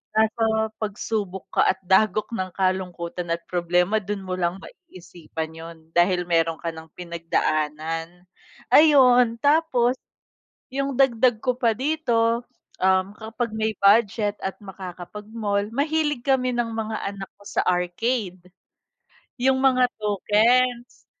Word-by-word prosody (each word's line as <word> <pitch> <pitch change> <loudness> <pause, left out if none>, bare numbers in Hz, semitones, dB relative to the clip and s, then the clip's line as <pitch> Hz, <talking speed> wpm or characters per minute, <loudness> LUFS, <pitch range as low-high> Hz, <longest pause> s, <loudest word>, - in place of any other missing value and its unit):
nasa 220 0 +2 0.2
pagsubok 205 -2 -4
ka - - +5
at 190 - -9
dagok 215 +2 +3
ng 185 -2 -3
kalungkutan 180 -2 -2
at 170 - 0
problema, 180 +3 +1
do'n 205 0 -4
mo 185 -1 -3
lang 180 +1 -1
maisipan 170 - -9
’yon 165 -1 -11
dahil 180 0 +2
meron 165 -1 +1
ka 170 - -6
nang 160 -1 -12
pinagdaanan. 165 0 -2 0.4
Ayun, 250 -6 +6
tapos 285 -4 +2 0.7
yung 275 +1 -2
dagdag 245 -3 +3
ko 250 -1 0
pa 235 -3 +2
dito, 240 -4 0 0.4
um, 190 0 +3
kapag 225 +1 -4
may 220 0 0
budget 205 0 +3
at 190 - -3
makakapag-mall, 200 +2 -5
mahilig 295 0 0
kami 255 -2 +1
ng 240 -1 -1
mga 220 0 -3
anak 195 -1 -7
ko - - -17
sa - - 0
arcade. 180 +2 -1 1.0
Yung 260 +1 +2
mga 255 -2 +4
tokens, 235 +4 +1
210 Hz, 120 wpm, -23 LUFS, 180-240 Hz, 1.0 s, Ayun